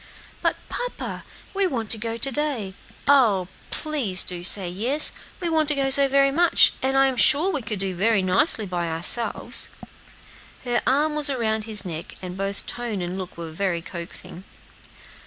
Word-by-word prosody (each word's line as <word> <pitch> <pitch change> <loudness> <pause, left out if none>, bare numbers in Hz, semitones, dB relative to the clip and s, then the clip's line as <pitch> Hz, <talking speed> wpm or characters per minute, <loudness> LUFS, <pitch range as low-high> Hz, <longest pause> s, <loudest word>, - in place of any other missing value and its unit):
"But, - - 0
papa, - - -6 0.3
we 395 -1 +1
want 230 -9 -4
to 225 - +3
go 230 +1 -5
to 275 +3 0
day. 260 -9 -2 0.3
Oh! 220 -10 +3 0.2
please 260 -12 +1
do 175 -1 -3
say 190 0 +5
yes; 235 +12 +2 0.3
we 355 - -3
want 320 -2 +1
to 295 - 0
go 270 -1 0
so 275 +1 +6
very 275 0 +2
much, 340 +4 +4
and 265 +1 0
I'm 270 -1 +2
sure 300 - +7
we 295 - -3
could 215 -2 -4
do 190 0 -3
very 200 +2 +1
nicely 195 - +1
by 175 -2 -3
ourselves." 165 +8 +1 0.9
Her 245 -1 -1
arm 295 +4 +1
was 300 -1 +3
around 220 -5 -2
his 215 -3 +1
neck, 165 -2 -7
and 180 -1 -8
both 195 +1 -4
tone 230 -6 -4
and 175 +1 -5
look 185 -2 -8
were 165 -1 -8
very 170 0 -3
coaxing. 170 +1 -6
225 Hz, 175 wpm, -22 LUFS, 185-275 Hz, 0.9 s, sure